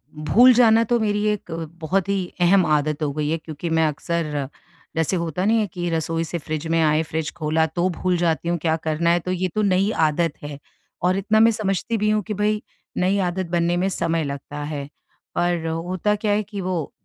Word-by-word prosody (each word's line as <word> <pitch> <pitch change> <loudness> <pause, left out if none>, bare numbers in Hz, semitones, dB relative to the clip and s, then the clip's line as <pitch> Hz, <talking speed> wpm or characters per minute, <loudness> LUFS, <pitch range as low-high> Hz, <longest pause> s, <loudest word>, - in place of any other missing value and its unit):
भूल 225 +12 +5
जाना 230 -2 +5
तो 240 -1 +3
मेरी 210 -1 0
एक 210 -4 -3 0.3
बहुत 180 +4 0
ही 200 - +1 0.2
अहम 185 +1 +5
आदत 150 0 +1
हो 145 - 0
गई 150 0 -2
है। 165 - 0
क्योंकि 160 +1 -6
मैं 160 0 +2
अक्सर 150 -2 -2 0.5
जैसे 165 +3 +1
होता 170 +2 -2
नहीं 225 +2 +3
है 210 - 0
कि 175 -1 -3
रसोई 165 0 -1
से 170 +2 -4
फ़्रिज 155 0 -4
में 165 0 +1
आए 155 0 +3
फ़्रिज 160 0 -3
खोला 160 +1 +1
तो 175 +2 -1
भूल 180 +1 -1
जाती 170 0 0
हूँ 175 - +1
क्या 160 -1 +1
करना 160 +2 +1
है 175 - +3
तो 180 +2 -4
ये 185 0 0
तो 215 - +2
नई 195 0 +2 0.2
आदत 160 +1 0
है। 145 -1 -6 0.4
और 180 +2 +2
इतना 210 +3 +2
मैं 225 +1 +6
समझती 215 +1 -1
भी 210 0 +1
हूँ 215 0 +2
कि 215 - -2
भई 210 +1 0 0.4
नई 185 +2 +2
आदत 185 +1 -2
बनने 175 0 +1
में 185 +2 +1
समय 165 -3 -1
लगता 145 +1 -6
है। 145 -2 -4 0.5
पर 175 -1 0
होता 180 +5 -1
क्या 210 0 -1
है 210 +1 +1
कि 200 -1 -6
वो 180 -5 -3
175 Hz, 215 wpm, -22 LUFS, 160-200 Hz, 0.5 s, मैं